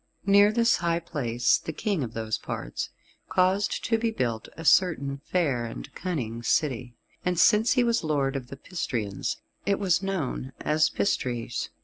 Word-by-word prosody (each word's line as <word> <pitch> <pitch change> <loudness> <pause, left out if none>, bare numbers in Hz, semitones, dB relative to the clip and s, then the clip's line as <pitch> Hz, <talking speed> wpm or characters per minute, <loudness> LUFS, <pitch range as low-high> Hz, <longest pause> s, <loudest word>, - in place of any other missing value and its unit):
Near 200 +1 +6
this 230 +1 +3
high 170 -1 +1
place 125 -8 +1
the - - -5
King 185 -1 -1
of 115 -2 -6
those 110 -1 -2
parts - - -4 0.4
caused 185 +2 +1
to 225 -1 +2
be 230 0 +1
built 120 - -2
a 165 - -7
certain 140 -7 +3
fair 145 -10 0
and 115 - -8
cunning 125 -11 -3
city, 125 -1 0 0.3
and 180 -2 0
since 220 +3 +5
he 250 - +3
was 235 -4 +1
lord 140 -3 0
of 130 -2 -4
the 135 - -9
Pistrians, 115 - -3 0.3
it 200 - +3
was 185 -3 +2
known 155 -9 -3
as 155 +1 +2
Pistres. 120 - -1
155 Hz, 160 wpm, -27 LUFS, 125-195 Hz, 0.4 s, Near